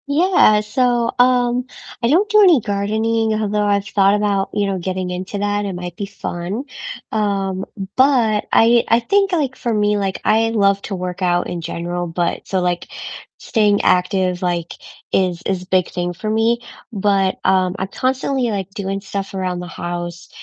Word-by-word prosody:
Yeah, 285 - +4
so, 240 +2 +1
um, 245 0 +3 0.4
I 235 - +2
don't 360 +9 +3
do 425 0 +5
any 355 -8 +6
gardening, 220 +2 0
although 210 -1 0
I've 200 -1 +1
thought 200 0 +3
about, 205 -2 0
you 205 - 0
know, 195 -1 -1
getting 185 +1 -3
into 185 +3 -5
that, 205 0 -1
it 195 - -3
might 175 -1 -6
be 200 - -4
fun. 195 +3 -5 0.5
Um, 195 -3 -1 0.3
but 245 -6 +3
I 235 +1 +5
I 230 - +4
think, 395 +11 +1
like, 290 -7 0
for 235 - -3
me, 210 -1 +2
like, 195 -2 -2
I 225 +1 +3
love 200 -3 +2
to 200 - -4
work 180 0 -5
out 175 -1 +1
in 175 -1 -4
general, 175 +1 -4
but 170 +1 -2
so, 190 - 0
like, 175 -1 -1 0.5
staying 210 -3 +1
active, 180 0 +1
like, 175 -2 -2 0.4
is 180 -2 +1
is 185 -2 -2
big 185 -1 +1
thing 175 0 -3
for 215 +5 -5
me. 225 +2 +2 0.3
But, 195 -2 +1
um, 185 -1 +2
I'm 190 - -3
constantly, 260 +2 -1
like, 195 -3 -3
doing 195 0 -4
stuff 195 0 -5
around 185 -2 -2
the 180 - -6
house, 175 -1 -6
200 Hz, 175 wpm, -19 LUFS, 185-225 Hz, 0.5 s, any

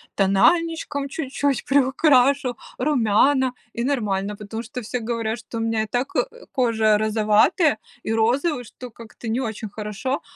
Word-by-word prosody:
тональничком 285 - +2
чуть-чуть 280 -2 -1
приукрашу, 270 -1 +3 0.2
румяна 260 0 +2 0.2
и 235 - -3
нормально. 210 -7 -1
Потому 220 +2 -6
что 250 0 -7
все 245 +2 -4
говорят, 230 0 -2
что 230 +1 -8
у - - -2
меня 225 -1 0
и - - -6
так, 245 +4 -2
э, - - +3 0.3
кожа 220 -4 +3
розоватая 215 - +3 0.3
и - - -3
розовый, 245 +6 +1
что 250 +3 -10
как-то 230 +1 -11
не 230 +3 0
очень 220 -2 -4
хорошо, 215 +6 -4
240 Hz, 145 wpm, -22 LUFS, 220-275 Hz, 0.3 s, приукрашу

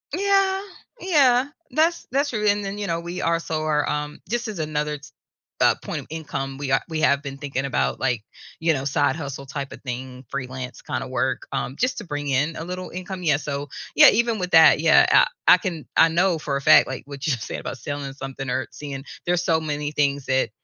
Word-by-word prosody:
Yeah, 390 0 +2 0.4
yeah. 275 - +4 0.3
That's 325 +5 +1
that's 280 +2 +1
true, 210 -2 -1
and 205 0 +2
then, 195 +1 -4
you 200 - -3
know, 165 0 -1
we 170 +1 -5
also 165 -1 -1
are, 150 -1 +1
um 150 0 -3
just 240 +1 -2
as 210 -6 -5
another, 150 -1 -2 0.6
uh, - - +5
point - - -4
of - - -15
income, 140 -4 -5
we 140 -2 -3
are 135 - +3
we 155 -1 -2
have 140 -2 +3
been 140 -1 -7
thinking 140 -1 -3
about, 135 - 0
like, 120 -5 0 0.4
you 165 0 +2
know, 135 -1 -3
side 145 +2 +1
hustle 140 -3 -6
type 140 0 -5
of - - -10
thing, 130 0 -6
freelance 130 -2 -6
kind - - -3
of - - -8
work, - - -1
um, 130 - -3
just 255 0 0
to 210 - -8
bring 145 -3 -4
in 145 +5 +1
a - - -5
little 180 +2 -6
income, 185 +1 -6
yeah, 145 -4 +3
so, 145 -1 -4 0.3
yeah, - - +9
even 235 0 +1
with 180 -1 -3
that, 160 -2 +7
yeah, 160 0 +6 0.4
I - - +10
I 180 - +7
can 170 -4 -5
I 165 - +7
know 175 0 +2
for 140 -2 -2
a - - -5
fact, - - +7
like 130 - -5
what 140 0 -7
you 150 - +2
said 120 -2 -5
about 130 - -6
selling 140 +2 -5
something 135 -1 -6
or 130 +1 -1
seeing 140 -2 -7 0.2
there's 175 0 +1
so 165 -3 +2
many 150 -1 -3
things 140 -2 0
that, 130 0 +1
150 Hz, 220 wpm, -23 LUFS, 140-180 Hz, 0.6 s, I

